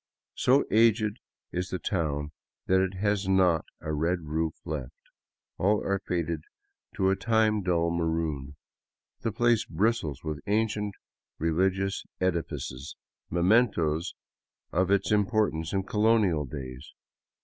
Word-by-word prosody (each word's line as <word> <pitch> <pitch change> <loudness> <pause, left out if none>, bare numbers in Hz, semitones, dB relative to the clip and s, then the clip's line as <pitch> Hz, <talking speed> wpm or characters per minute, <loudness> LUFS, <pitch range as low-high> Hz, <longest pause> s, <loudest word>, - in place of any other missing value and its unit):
So 135 +3 +4
aged 110 -1 +3 0.3
is 90 +1 -2
the 95 - -2
town 75 -6 -2 0.3
that 95 0 +3
it 95 0 -1
has 100 0 0
not 90 -5 +3 0.2
a 80 0 -3
red 85 +4 0
roof 80 +1 -2
left; 70 -5 -5 0.6
all 105 +3 +2
are 100 0 0
faded 85 -3 -1 0.5
to 95 0 +2
a - - +2
time 110 -1 +2
dulled 85 -2 +1
maroon. 80 -4 -2 0.6
The 115 - -2
place 120 0 +3
bristles 105 - -1
with 75 -2 -4
ancient 105 -1 0 0.4
religious 95 +4 0 0.2
edi 90 -2 +2
fices, 65 -2 -7 0.3
mementoes 85 -4 +2 0.6
of 95 +1 +1
its 100 0 +2
importance 105 -6 +1
in 95 -1 0
colonial 105 -6 +2
days. 65 0 -8
95 Hz, 125 wpm, -28 LUFS, 80-105 Hz, 0.6 s, So